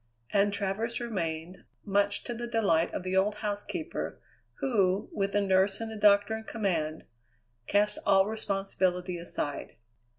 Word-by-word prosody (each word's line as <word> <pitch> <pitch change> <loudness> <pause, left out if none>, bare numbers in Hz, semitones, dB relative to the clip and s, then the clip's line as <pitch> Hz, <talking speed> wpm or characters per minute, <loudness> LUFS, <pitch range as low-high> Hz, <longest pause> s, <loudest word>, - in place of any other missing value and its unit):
And 205 0 +4
Travers 205 +4 -2
remained, 175 -6 -4 0.2
much 200 0 +1
to 240 - -4
the 240 +1 -5
delight 195 -8 +2
of - - -4
the 185 0 -2
old 200 +2 +3
housekeeper, 210 - -3 0.4
who, 200 -7 +1
with 195 0 -1
a 205 - +4
nurse 195 0 +3
and 225 -1 -4
a - - -6
doctor 205 +1 +4
in 220 - -6
command, 170 -9 -2 0.6
cast 210 +1 +2
all 195 0 +5
responsibility 190 -4 -1
aside. 145 -4 -4
200 Hz, 140 wpm, -29 LUFS, 185-215 Hz, 0.6 s, all